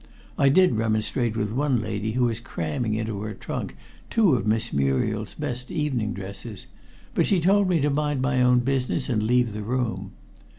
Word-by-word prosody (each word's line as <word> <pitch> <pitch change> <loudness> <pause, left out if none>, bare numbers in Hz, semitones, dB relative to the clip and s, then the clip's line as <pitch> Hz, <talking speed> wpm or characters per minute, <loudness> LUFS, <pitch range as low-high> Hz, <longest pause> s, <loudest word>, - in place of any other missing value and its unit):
I 140 - +4
did 185 +2 +5
remonstrate 110 +1 0
with 105 -2 -1
one 135 0 +1
lady 110 0 -3
who 125 +1 +1
was 115 -2 -1
cramming 110 0 -3
into 110 -2 -3
her 105 0 -5
trunk - - -5 0.3
two 215 -9 +4
of 115 -4 0
Miss 110 +2 0
Muriel's 70 -1 0
best 125 +1 -4
evening 130 -9 -1
dresses, 100 +1 -7 0.5
but - - +2
she 195 - +3
told 195 +3 +3
me 175 -3 +3
to 145 +1 +2
mind 150 -1 0
my 130 0 +1
own 125 0 +5
business 130 +1 -1
and 110 -4 +1
leave 120 0 +2
the 105 - -4
room. 110 -4 -2
120 Hz, 180 wpm, -25 LUFS, 110-135 Hz, 0.5 s, did